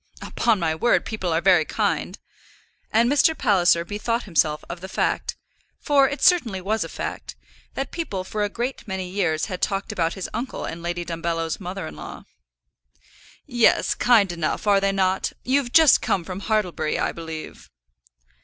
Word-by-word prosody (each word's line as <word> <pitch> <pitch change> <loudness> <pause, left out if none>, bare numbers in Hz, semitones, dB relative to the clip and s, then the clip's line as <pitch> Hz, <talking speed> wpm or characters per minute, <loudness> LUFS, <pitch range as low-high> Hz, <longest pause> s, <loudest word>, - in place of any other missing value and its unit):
"Upon 230 -3 +1
my 165 -2 0
word, 240 +10 +2
people 190 -6 -3
are 165 +1 +1
very 180 -4 +5
kind." - - -2 0.7
And 230 +2 +4
Mr. 290 +4 +3
Palliser 180 -7 +3
bethought 230 +5 -2
himself 155 -4 +1
of 175 0 -7
the 190 - -7
fact, - - -1 0.4
for 280 -2 +3
it 285 - -5
certainly 245 - +3
was 215 +4 -1
a - - -7
fact, - - -6 0.4
that 270 -1 -3
people 210 - -4
for 210 +3 -3
a 205 - 0
great 240 +4 -4
many 190 -2 -4
years 175 -4 0
had 185 -4 -6
talked 195 0 -1
about 165 -1 -1
his 190 - -4
uncle 255 +3 -4
and 165 - -6
Lady 175 0 -3
Dumbello's 165 -1 -3
mother 185 -1 -5
in - - -8
law. - - -9 1.2
"Yes; 240 -2 +3
kind 220 -6 +4
enough; 170 +2 -2
are 200 -1 +4
they 195 0 +2
not? 190 -1 0
You've 260 -1 +1
just 320 -2 +6
come 180 - 0
from 185 +2 -6
Hartlebury, 185 -7 -1
I - - 0
believe." 160 -1 -8
190 Hz, 170 wpm, -23 LUFS, 170-230 Hz, 1.2 s, just